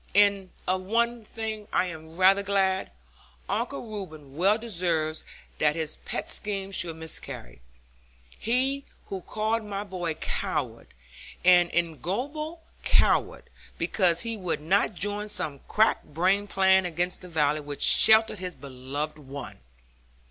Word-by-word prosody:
And 200 -2 +4 0.2
of 185 +1 +1
one 235 +4 0
thing 215 -1 -5
I - - +2
am 160 -1 -7
rather 190 +2 +6
glad; 195 -1 +1 0.6
Uncle 140 - -2
Reuben 160 -10 -8
well 195 +6 +3
deserves 170 -8 -1 0.4
that 150 0 +3
his 160 -2 -1
pet - - -5
scheme 195 -2 0
should 175 -4 -1
miscarry. 160 - -6 0.8
He 265 +4 +1 0.3
who 190 -1 -4
called 220 +4 -1
my 205 -1 -4
boy 180 -5 -3
a - - -17
coward, - - -3 0.6
an 175 -1 +6
ignoble 250 - -2 0.2
coward, - - +2 0.3
because 175 -4 +2
he 230 -1 -3
would 180 -5 -2
not 195 +5 +2
join 205 +3 -2
some 145 -8 -3
crack 220 +1 +3
brained 190 +6 +1
plan 190 -1 +4
against 175 +2 -1
the 180 - -9
valley 150 -2 +2
which 145 -1 -5
sheltered 220 -2 +6
his 180 -1 -5
beloved 140 +3 -5
one! 140 -2 -8
185 Hz, 135 wpm, -27 LUFS, 160-210 Hz, 0.8 s, rather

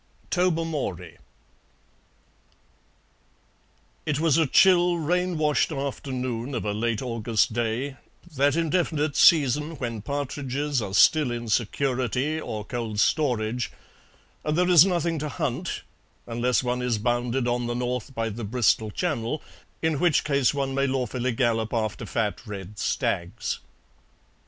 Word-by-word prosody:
TOBERMORY 160 - -1 2.9
It 150 -1 0
was 160 -1 +3
a 160 - +3
chill, 175 +3 +5
rain 180 +2 0
washed 150 +1 +2
afternoon 130 -3 -3
of 115 - -3
a 105 - -1
late 115 +3 -1
August 115 -2 0
day, 120 +4 -2 0.4
that 140 +2 +3
indefinite 160 -3 0
season 150 0 +4
when 115 -4 -4
partridges 140 +1 -2
are 100 -2 -4
still 155 -5 +5
in 120 -1 -4
security 130 +5 0
or 105 -6 -5
cold 115 -4 -4
storage, 125 -4 +1 0.7
and 150 +1 -1
there 180 0 +3
is 175 0 +8
nothing 170 -3 0
to 150 +1 -3
hunt 130 - -3 0.4
unless 120 +2 0
one 125 0 -1
is 125 -2 0
bounded 120 +3 0
on 120 0 0
the 120 - -2
north 125 +1 -3
by 115 0 -1
the 115 +2 -6
Bristol 110 0 +2
Channel, 145 - -2 0.4
in 160 -3 +1
which 175 -2 +3
case 140 -3 +2
one 135 -2 -2
may 135 +1 +1
lawfully 130 -1 -1
gallop 115 -2 0
after 110 -2 -2
fat 110 -3 -1
red 100 -1 -7
stags. 85 -1 -2
130 Hz, 130 wpm, -25 LUFS, 115-150 Hz, 2.9 s, is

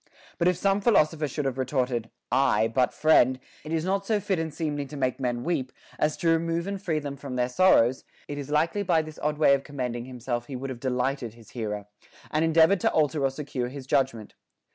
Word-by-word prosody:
But 170 - +3
if 180 -1 +3
some 195 +2 +1
philosopher 155 -8 +3
should 145 +1 -3
have 135 -1 -2
retorted, 125 -3 -1 0.2
Aye; 115 -4 +3
but, 125 +1 +2
friend, 130 -5 +4 0.2
it 155 - -8
is 165 0 0
not 195 +1 0
so 210 +1 +1
fit 195 -4 -1
and 160 -1 -2
seemly 150 -2 -3
to 150 - -8
make 130 -1 -1
men 120 -2 -2
weep, 150 -7 -1 0.3
as 150 0 +1
to 170 - +1
remove 165 +1 +1
and 200 -1 -4
free 165 -5 -1
them 145 -2 -4
from 140 -2 -7
their 125 -1 +1
sorrows, 130 -5 +4 0.2
it 145 0 -5
is 140 0 -6
likely 160 +7 +1
by 165 -5 +2
this 155 0 -10
odd 150 0 0
way 150 -2 +5
of 140 0 +1
commending 125 -5 -4
himself 120 -1 -4
he 135 - -6
would 135 +1 -4
have 125 - -7
delighted 125 -2 -2
his 115 -2 -17
hearer, 105 -4 -4 0.5
and 155 +1 +1
endeavored 165 +4 +5
to - - +2
alter 150 -1 +1
or 135 - +3
secure 135 -3 -4
his 135 +1 -8
judgment. 130 -5 0
140 Hz, 220 wpm, -26 LUFS, 125-160 Hz, 0.5 s, way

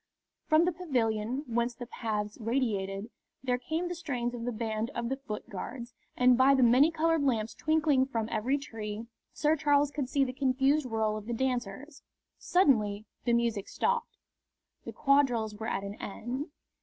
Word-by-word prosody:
From 315 +1 +5
the 360 - +2
pavilion, 250 -7 -1
whence 235 0 -1
the 245 - -7
paths 215 -3 -3
radiated, 215 -3 -1 0.3
there 250 -1 0
came 320 +7 -2
the 350 - -3
strains 255 -8 -3
of 235 -1 -5
the 245 - -1
band 220 0 -2
of 235 0 -2
the 265 - 0
Foot 240 -6 -7
Guards, 235 +4 -7 0.2
and 250 0 +6
by 265 +2 +5
the 260 - +4
many 255 +6 +6
coloured 330 -1 +1
lamps 225 -5 0
twinkling 305 -4 +2
from 225 -5 -2
every 260 +6 +1
tree 220 -5 -6 0.3
Sir 305 +1 +2
Charles 290 -1 +3
could 280 -4 -3
see 280 0 +2
the 255 -1 -2
confused 270 +2 +2
whirl 220 -2 0
of 215 0 -9
the 240 - -2
dancers. 255 +3 -3 0.4
Suddenly 215 - +2 0.2
the 240 - +2
music 230 -4 0
stopped. 475 0 -1 0.7
The - - -5
quadrilles 265 -7 +2
were 220 +2 -6
at 195 - -2
an 200 +1 -7
end. 250 - -4
245 Hz, 170 wpm, -30 LUFS, 220-280 Hz, 0.7 s, and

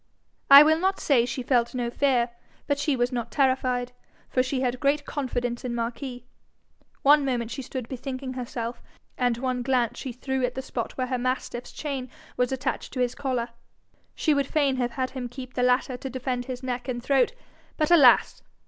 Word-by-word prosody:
I 280 +1 +12
will 315 +1 +3
not 380 +2 +1
say 245 -5 +3
she 255 +1 -4
felt 240 -1 +1
no 240 -1 -1
fear, 250 -3 +2 0.3
but 285 -1 0
she 285 -1 +1
was 245 0 0
not 240 -2 -3
terrified, 255 -3 +1 0.4
for 255 - +2
she 255 +1 -1
had 250 -1 -1
great 285 +1 +1
confidence 245 -4 -3
in 245 -2 -3
Marquis. 245 +1 -4 0.8
One 290 +1 +6
moment 240 -4 -1
she 270 - -4
stood 255 -2 -6
bethinking 260 0 -5
herself, 240 -1 -5 0.3
and 245 -2 +1
one 255 0 -1
glance 245 -2 0
she 265 - -5
threw 265 +2 -3
at 250 0 -1
the 265 - -4
spot 235 -3 -4
where 255 - 0
her 255 0 -2
mastiff's 250 -1 -3
chain 275 -4 -4 0.3
was 250 0 0
attached 265 0 -3
to 255 - -4
his 250 -1 +1
collar: 250 -4 -2 0.7
she 310 - +2
would 280 -2 +1
fain 280 -3 +1
have 245 -1 -1
had 260 -1 -2
him 250 -2 -5
keep 255 0 -9
the 250 - -1
latter 250 +1 +2
to 265 - -6
defend 255 -1 -3
his 255 0 -6
neck 250 0 -3
and 240 -2 -3
throat: 275 - +2 0.4
but 305 +1 +1
alas! 280 -8 +6
255 Hz, 195 wpm, -26 LUFS, 245-270 Hz, 0.8 s, I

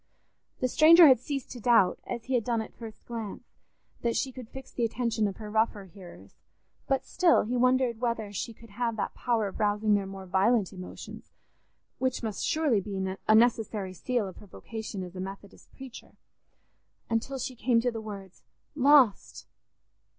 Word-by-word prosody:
The 255 - +2
stranger 325 +5 +8
had 260 -6 +7
ceased 275 +1 -5
to 245 - -7
doubt, 225 -6 +3
as 235 -2 -5
he 260 - -3
had 240 -3 +2
done 235 0 0
at 220 - -5
the - - -34
first 225 -2 -10
glance, 225 -4 -6 0.6
that 235 -1 0
she 265 - -1
could 250 -3 -10
fix 265 0 -10
the 240 - -3
attention 230 -1 0
of 195 - -5
her 210 -1 -8
rougher 220 -2 0
hearers, 180 -1 -14 0.5
but 270 -2 0
still 350 -3 +3
he 240 +4 -3
wondered 250 -2 +2
whether 230 -4 -2
she 220 +4 -4
could 230 -1 -16
have 230 +1 -2
that - - -2
power 230 -4 0
of 195 - -8
rousing 210 0 +2
their 200 -1 +1
more 195 0 -8
violent 195 +2 +2
emotions, 185 -1 -10 0.7
which 260 -1 -1
must 215 -4 -3
surely 295 -10 +1
be 200 +1 -6 0.3
a 215 - +6
necessary 220 -4 +2
seal 235 +4 -2
of 185 - -10
her 205 - -13
vocation 220 -1 -7
as 180 0 -10
a - - -6
Methodist 195 +1 -10
preacher, 260 -3 -12 0.9
until 235 +4 -2
she 255 0 -5
came 235 0 +2
to 245 +1 0
the 225 -1 -6
words, 200 -4 -10 0.3
"Lost! 275 -6 +3
230 Hz, 180 wpm, -28 LUFS, 205-250 Hz, 0.9 s, stranger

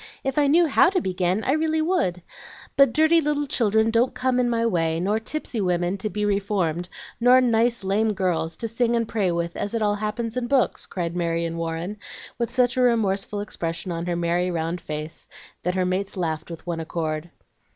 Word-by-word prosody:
If 270 +1 0
I 290 - +4
knew 335 +5 +5
HOW 300 - +5
to 375 -1 +1
begin, 185 - 0
I - - +1
really 315 +1 +1
would. 310 - 0 0.5
But 275 -3 +6
dirty 315 +4 +4
little 295 -1 0
children 220 -4 +2
don't 235 +3 +2
come 255 -1 +1
in 245 -1 +2
my 230 -1 +1
way, 165 -6 +1
nor 205 +5 +1
tipsy 240 -2 -4
women 180 0 0
to 215 - -2
be 210 0 -2
reformed, 195 -4 0 0.3
nor 250 +2 +6
nice 235 -2 +2
lame 210 +3 +1
girls 180 -4 -1
to 230 - -3
sing 235 +1 +1
and 230 -1 0
pray 200 -6 0
with, 170 0 -2
as 205 +3 -3
it 230 - -1
all 205 -1 +2
happens 215 +2 -3
in 250 -1 -1
books," 265 -1 +1
cried 170 -2 -3
Marion 170 -1 -1
Warren, 165 +4 -3 0.4
with 235 - 0
such 250 0 +1
a - - +3
remorseful 205 -4 +1
expression 175 -2 -4
on 170 +1 -4
her 175 - 0
merry 175 +1 0
round 170 0 -2
face 155 +1 -6 0.3
that 180 +1 -1
her 185 -1 +1
mates 190 +2 -2
laughed 160 -3 -2
with 165 0 -9
one 170 -2 -3
accord. 160 0 -3
205 Hz, 200 wpm, -24 LUFS, 175-240 Hz, 0.5 s, But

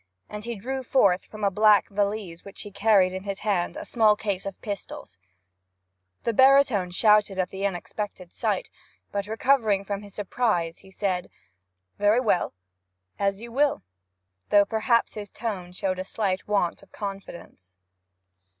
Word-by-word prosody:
And 210 +1 -8
he 235 0 -3
drew 260 +6 -4
forth 200 -8 +3
from 215 -1 -10
a 200 - +3
black 210 0 +5
valise 200 -4 -2
which 200 - -10
he 205 - -9
carried 200 -2 +3
in 190 - -4
his 200 0 -5
hand 195 -5 0
a - - -6
small 220 -3 +4
case 200 -2 -3
of 195 - -7
pistols. 175 - -7 1.0
The 235 - 0
baritone 260 -7 +5
started 210 0 +3
at 185 -1 -1
the 195 +1 -1
unexpected 185 0 -6
sight, - - -2 0.4
but 200 0 -3
recovering 220 -3 +2
from 200 0 -3
his 205 -1 -13
surprise 195 -5 -1
said, 185 -2 -2 0.7
'Very 205 +3 +4
well, 210 - +1 0.6
as 195 +1 0
you 235 0 -8
will,' 285 +3 +1 0.7
though 205 -1 +6
perhaps 230 +2 +1
his 205 -1 -7
tone 200 -6 -5
showed 185 0 -2
a - - -2
slight 190 -1 -2
want 200 -5 0
of - - -20
confidence. 185 - -8
205 Hz, 150 wpm, -26 LUFS, 190-220 Hz, 1.0 s, though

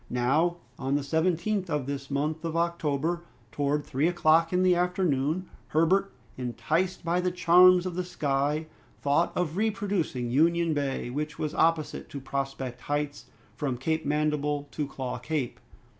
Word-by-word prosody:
Now, 150 +8 +2 0.2
on 135 +1 0
the 145 - 0
17th 175 +6 0
of 150 -4 -1
this 140 -1 -5
month 150 +3 -1
of 165 -1 -3
October, 170 -1 0 0.3
towards 145 +3 -1
three 140 +5 +1
o'clock 165 -1 +3
in 180 0 +2
the 180 -1 +5
afternoon, 175 -2 0 0.2
Herbert, 185 +5 +2 0.3
enticed 155 +10 -1
by 175 +2 +1
the 180 - +1
charms 180 +1 +6
of 185 - -3
the 180 +1 -2
sky, 150 -2 -1 0.4
thought 145 +4 +2
of 175 -1 -1
reproducing 195 - -1
Union 165 +4 +3
Bay, 140 -4 -2
which 150 +3 -3
was 155 -1 -2
opposite 165 -2 +1
to 140 - -6
Prospect 135 -2 -4
Heights, 145 0 -3 0.3
from 135 -5 -2
Cape 160 +5 -1
Mandible 150 -1 0
to 150 -2 -2
Claw 130 -3 -5
Cape. 140 -1 -3
155 Hz, 150 wpm, -28 LUFS, 140-175 Hz, 0.4 s, charms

